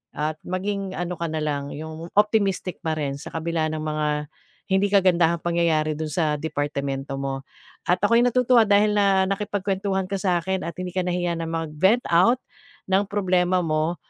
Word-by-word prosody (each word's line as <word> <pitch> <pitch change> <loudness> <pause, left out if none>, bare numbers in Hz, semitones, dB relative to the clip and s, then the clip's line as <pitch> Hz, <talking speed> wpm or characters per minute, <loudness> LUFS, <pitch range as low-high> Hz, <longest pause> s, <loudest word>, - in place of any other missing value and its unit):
at 155 +1 -2
maging 195 +1 -3
ano 175 0 -2
ka 170 - -2
na 155 -1 -2
lang, 145 -1 -2
'yung 160 +2 -7
optimistic 200 -4 +1
pa 160 -2 -1
rin 140 -2 -2
sa - - -8
kabila 165 -1 -1
ng 155 -1 -3
mga 155 -1 -1 0.6
hindi 190 +1 +3
kagandahang 175 -4 +4
pangyayari 165 -3 +1
dun 155 -1 -3
sa 155 -2 +1
departamento 140 -3 -3
mo. 135 0 -3 0.4
At 180 +1 +3
ako'y 230 +3 +5
natutuwa 250 -1 +4
dahil 205 +1 +4
na 195 -2 +4
nakipagkwentuhan 195 -1 -1
ka 195 - 0
sakin 185 0 0
at 170 - -6
hindi 180 -1 -4
ka 185 - 0
nahiya 175 -1 0
na 165 - -3
mag-vent 165 +8 +1
out 185 +9 +5 0.5
ng 195 +1 +2
problema 185 -2 +2
mo, 155 +1 0
175 Hz, 165 wpm, -24 LUFS, 155-195 Hz, 0.6 s, ako'y